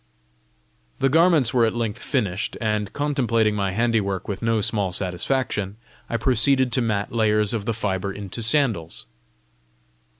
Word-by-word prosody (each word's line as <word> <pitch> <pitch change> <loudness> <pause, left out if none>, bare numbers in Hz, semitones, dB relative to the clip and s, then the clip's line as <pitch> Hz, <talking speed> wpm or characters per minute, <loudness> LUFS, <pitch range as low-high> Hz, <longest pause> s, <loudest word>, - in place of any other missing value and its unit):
The 135 - +2
garments 160 -4 +4
were 120 -2 +4
at 115 0 +1
length 115 -1 -3
finished, 105 -7 -2
and, 105 -3 -1
contemplating 120 -7 +1
my 100 -2 -1
handiwork 100 -3 0
with 100 -2 -4
no 115 -1 +1
small 100 -2 0
satisfaction, 100 +3 -1 0.3
I 115 - 0
proceeded 130 +2 +3
to 130 - +2
mat 105 -3 -1
layers 105 -2 +2
of 110 -3 -3
the 115 - 0
fibre 100 -3 -2
into 100 +3 -7
sandals. 110 - 0
110 Hz, 140 wpm, -23 LUFS, 100-120 Hz, 0.3 s, garments